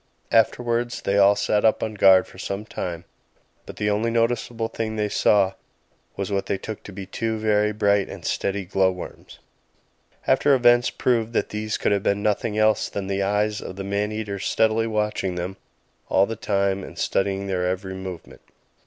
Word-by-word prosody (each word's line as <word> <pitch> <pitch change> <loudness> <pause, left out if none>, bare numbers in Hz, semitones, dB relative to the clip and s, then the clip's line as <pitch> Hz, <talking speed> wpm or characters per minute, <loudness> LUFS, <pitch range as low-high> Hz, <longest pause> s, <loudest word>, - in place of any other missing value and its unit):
Afterwards 120 +1 +1
they 100 +1 +2
all 100 +1 +6
sat 105 0 +1
up 110 - +3
on 110 - -2
guard 95 -2 +6
for 95 - -15
some 100 +2 -4
time; 85 -5 -5 0.6
but - - -8
the 105 0 0
only 110 +3 0
noticeable 115 0 0
thing 110 -1 -4
they 105 -1 -1
saw 100 -2 +3 0.6
was 100 +1 -3
what 100 -1 -1
they 100 - 0
took 110 +2 -7
to - - -8
be 95 0 -7
two 110 +3 -2
very 105 -1 +2
bright 100 -1 +1
and - - -9
steady 100 -1 -1
glow 95 +1 +2
worms. 90 -1 -10 0.9
After 145 -1 +4
events 120 -1 +4
proved 115 -2 0
that - - 0
these 105 0 -3
could - - 0
have 100 -1 +2
been 100 +1 0
nothing 105 +1 0
else 110 0 +2
than 100 - -4
the 100 0 -1
eyes 105 +2 0
of 95 - -7
the 95 - -5
man 100 +2 -1
eater 105 -2 -4
steadily 110 +3 +1
watching 105 -4 -1
them 90 +2 -4 0.5
all 95 - +4
the 115 - -5
time 100 -2 0
and - - -10
studying 95 0 0
their 90 -2 -1
every 95 +1 -3
movement. 95 -2 -8
105 Hz, 185 wpm, -23 LUFS, 95-110 Hz, 0.9 s, all